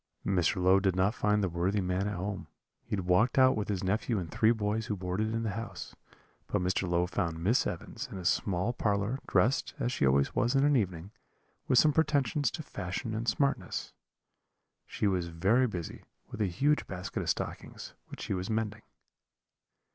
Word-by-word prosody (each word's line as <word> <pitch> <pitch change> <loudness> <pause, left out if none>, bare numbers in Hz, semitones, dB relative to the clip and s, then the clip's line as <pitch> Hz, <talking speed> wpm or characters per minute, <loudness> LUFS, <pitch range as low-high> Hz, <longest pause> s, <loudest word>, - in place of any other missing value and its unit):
Mr. 95 +1 +1
Low 95 +2 +5
did 95 -2 +1
not 95 +3 +2
find 105 -3 +1
the - - +2
worthy 90 +4 0
man 90 +1 -1
at 105 - -3
home; 100 +3 -4 0.4
he - - -3
had 95 -3 -3
walked 90 +9 +3
out 130 0 +6
with 105 -1 -2
his 100 -3 -2
nephew 105 +4 0
and 85 -4 -4
three 110 - +3
boys 110 0 -1
who 105 - -1
boarded 95 +4 -2
in 115 0 -1
the 110 - -1
house; 115 +4 -7 0.5
but 105 - 0
Mr. 90 0 0
Low 85 0 +2
found 90 -2 -2
Miss 100 +10 +2
Evans - - -6
in - - -6
a 90 - -7
small 95 +4 +1
parlour, 105 +3 0
dressed, 130 +5 +1
as 120 - -1
she 70 - +1
always 70 +1 +2
was 120 +4 +1
in 135 - +4
an 145 0 +4
evening, 95 -5 -1 0.6
with 130 - +3
some 150 +4 +6
pretensions 145 -2 +2
to 155 - -6
fashion 100 -1 -4
and 115 +2 -3
smartness: 140 +4 -1 0.9
she - - -2
was 90 -4 +1
very 95 +10 +2
busy 90 -7 -6 0.3
with - - -5
a 105 - +2
huge 140 +12 +1
basket 95 0 -4
of - - -3
stockings, - - -4
which - - -10
she - - -2
was 95 0 -3
mending. 110 -1 -2
105 Hz, 190 wpm, -30 LUFS, 90-115 Hz, 0.9 s, out